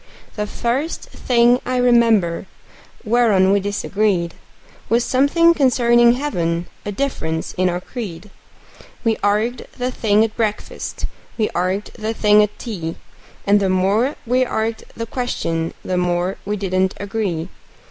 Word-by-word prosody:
The 210 Hz, -1 st, -2 dB
first 255 Hz, +10 st, -2 dB
thing 240 Hz, 0 st, +3 dB
I 255 Hz, 0 st, -1 dB
remember 230 Hz, -8 st, +3 dB, 0.6 s
whereon 215 Hz, -5 st, +3 dB
we 200 Hz, -, +4 dB
disagreed 200 Hz, -3 st, 0 dB, 0.6 s
Was 235 Hz, +1 st, +2 dB
something 310 Hz, +6 st, +4 dB
concerning 240 Hz, -4 st, +4 dB
heaven 175 Hz, -, -1 dB, 0.2 s
a -, -, -1 dB
difference 195 Hz, -9 st, -3 dB
in 185 Hz, 0 st, +1 dB
our 175 Hz, 0 st, -2 dB
creed; 195 Hz, -3 st, -7 dB, 0.7 s
We 225 Hz, -2 st, +1 dB
arg'ed 215 Hz, +5 st, 0 dB
the 250 Hz, 0 st, -1 dB
thing 215 Hz, -3 st, +2 dB
at 225 Hz, -1 st, -2 dB
breakfast, 215 Hz, -2 st, -3 dB, 0.3 s
we 215 Hz, -2 st, +1 dB
arg'ed 185 Hz, +4 st, -2 dB
the 220 Hz, +1 st, -4 dB
thing 210 Hz, -1 st, +5 dB
at 210 Hz, 0 st, -1 dB
tea, 170 Hz, -9 st, -5 dB, 0.5 s
And 205 Hz, +1 st, +4 dB
the 195 Hz, -1 st, +1 dB
more 200 Hz, +9 st, +2 dB
we 250 Hz, +2 st, +2 dB
arg'ed 225 Hz, -2 st, -2 dB
the 230 Hz, -, -3 dB
question 165 Hz, -9 st, -2 dB
the 185 Hz, -, -1 dB
more 180 Hz, +1 st, 0 dB
we 210 Hz, +1 st, -2 dB
didn't 190 Hz, -1 st, 0 dB
agree. 195 Hz, -5 st, -3 dB
210 Hz, 135 wpm, -20 LUFS, 185-240 Hz, 0.7 s, thing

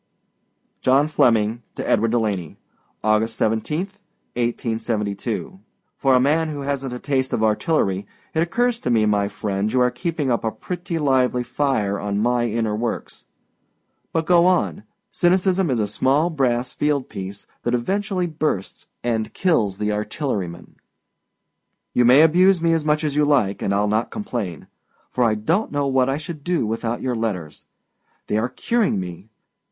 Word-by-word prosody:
JOHN 135 Hz, +4 st, +3 dB
FLEMMING 115 Hz, -5 st, +2 dB
TO -, -, -4 dB
EDWARD 115 Hz, +1 st, +2 dB
DELANEY. 105 Hz, -8 st, -1 dB, 0.5 s
August 110 Hz, +1 st, +2 dB
17, 110 Hz, +10 st, 0 dB, 0.5 s
1872. 115 Hz, -, -2 dB, 0.4 s
For 135 Hz, -2 st, +3 dB
a -, -, +5 dB
man 155 Hz, +5 st, +2 dB
who 145 Hz, -2 st, -5 dB
hasnât 135 Hz, -2 st, -2 dB
a -, -, -4 dB
taste 130 Hz, 0 st, -1 dB
for 110 Hz, -, -1 dB
artillery, 105 Hz, -, +1 dB, 0.3 s
it 160 Hz, -, 0 dB
occurs 235 Hz, +7 st, +1 dB
to -, -, -3 dB
me, 110 Hz, -3 st, +3 dB
my 105 Hz, -1 st, +2 dB
friend, 100 Hz, 0 st, -2 dB
you 130 Hz, -, +2 dB
are 125 Hz, 0 st, +3 dB
keeping 160 Hz, -5 st, -2 dB
up 120 Hz, -, 0 dB
a 110 Hz, -, +1 dB
pretty 175 Hz, +6 st, -5 dB
lively 130 Hz, -4 st, +2 dB
fire 110 Hz, -8 st, 0 dB
on 100 Hz, 0 st, -2 dB
my 120 Hz, +2 st, +2 dB
inner 110 Hz, -1 st, -1 dB
works. 115 Hz, -, -4 dB, 0.9 s
But 165 Hz, -1 st, 0 dB
go 175 Hz, 0 st, +5 dB
on. 185 Hz, +2 st, +1 dB, 0.3 s
Cynicism 185 Hz, 0 st, +2 dB
is 125 Hz, -3 st, +1 dB
a 105 Hz, -, +2 dB
small 135 Hz, -, +1 dB
brass 125 Hz, -4 st, 0 dB
field 145 Hz, -3 st, 0 dB
piece 95 Hz, +1 st, -7 dB, 0.2 s
that 120 Hz, -, 0 dB
eventually 190 Hz, -, -1 dB
bursts 155 Hz, -, -3 dB, 0.2 s
and 115 Hz, -2 st, -1 dB
kills 110 Hz, -, +1 dB
the 105 Hz, 0 st, -1 dB
artilleryman. 105 Hz, -, -4 dB, 1.2 s
You 125 Hz, -, +4 dB
may 130 Hz, +6 st, +7 dB
abuse 180 Hz, +3 st, +5 dB
me 165 Hz, 0 st, +2 dB
as 165 Hz, -2 st, +1 dB
much 150 Hz, +1 st, +1 dB
as 150 Hz, -2 st, -1 dB
you 150 Hz, -, +3 dB
like, 130 Hz, -10 st, +2 dB
and 100 Hz, -, 0 dB
Iâll 100 Hz, +1 st, +2 dB
not 110 Hz, +2 st, 0 dB
complain; 120 Hz, -, -4 dB, 0.5 s
for 125 Hz, -, +1 dB
I 110 Hz, -2 st, +3 dB
donât 165 Hz, -, 0 dB
know 145 Hz, -1 st, -1 dB
what 130 Hz, -1 st, +2 dB
I 135 Hz, -, 0 dB
should 155 Hz, -1 st, -7 dB
do 175 Hz, -7 st, 0 dB
without 115 Hz, +2 st, -2 dB
your 125 Hz, -2 st, -1 dB
letters. 95 Hz, -9 st, -4 dB, 0.6 s
They 105 Hz, -, 0 dB
are 120 Hz, +3 st, -1 dB
curing 215 Hz, -, 0 dB
me. 90 Hz, +3 st, -7 dB
125 Hz, 160 wpm, -22 LUFS, 110-155 Hz, 1.2 s, may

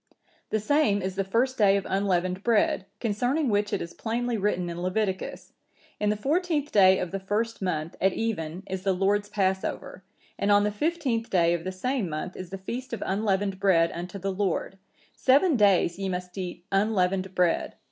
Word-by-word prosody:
The 220 Hz, -, 0 dB
same 215 Hz, -3 st, +2 dB
is 190 Hz, 0 st, -2 dB
the 195 Hz, -, 0 dB
first 235 Hz, +7 st, 0 dB
day 200 Hz, -2 st, +5 dB
of 195 Hz, -, -3 dB
unleavened 185 Hz, -1 st, 0 dB
bread, 210 Hz, -4 st, +2 dB
concerning 245 Hz, +6 st, 0 dB
which 205 Hz, -1 st, +1 dB
it -, -, -1 dB
is 170 Hz, -, -9 dB
plainly 240 Hz, +1 st, -2 dB
written 195 Hz, -4 st, 0 dB
in 170 Hz, 0 st, -5 dB
Leviticus,(962) 190 Hz, +1 st, -2 dB, 0.5 s
'In 210 Hz, -, +1 dB
the 210 Hz, -, +2 dB
fourteenth 300 Hz, -, 0 dB
day 190 Hz, -2 st, +6 dB
of 180 Hz, -, -3 dB
the 195 Hz, -, -3 dB
first 215 Hz, +4 st, -2 dB
month, 165 Hz, -3 st, -2 dB
at 195 Hz, -, +4 dB
even, 185 Hz, -6 st, -3 dB
is 190 Hz, -1 st, -4 dB
the 195 Hz, 0 st, +1 dB
Lord's 205 Hz, +2 st, +1 dB
Passover. 190 Hz, -2 st, -2 dB, 0.4 s
And 200 Hz, -, +2 dB
on 205 Hz, 0 st, +5 dB
the 210 Hz, -, +1 dB
fifteenth 255 Hz, -2 st, -1 dB
day 170 Hz, -2 st, +3 dB
of 170 Hz, -1 st, -2 dB
the 185 Hz, -, -3 dB
same 220 Hz, +1 st, -2 dB
month 155 Hz, +4 st, -5 dB
is 185 Hz, -1 st, -7 dB
the 195 Hz, -, -5 dB
feast 240 Hz, +7 st, -6 dB
of 230 Hz, -, -3 dB
unleavened 195 Hz, -1 st, 0 dB
bread 170 Hz, -4 st, +3 dB
unto 175 Hz, +3 st, -6 dB
the 195 Hz, +1 st, -2 dB
Lord; 195 Hz, 0 st, -2 dB, 0.3 s
seven 285 Hz, +5 st, +4 dB
days 195 Hz, -5 st, +3 dB
ye 195 Hz, -1 st, -2 dB
must 180 Hz, 0 st, -5 dB
eat 180 Hz, -2 st, -6 dB
unleavened 195 Hz, -2 st, +1 dB
bread. 180 Hz, -2 st, +1 dB
195 Hz, 190 wpm, -27 LUFS, 185-220 Hz, 0.5 s, day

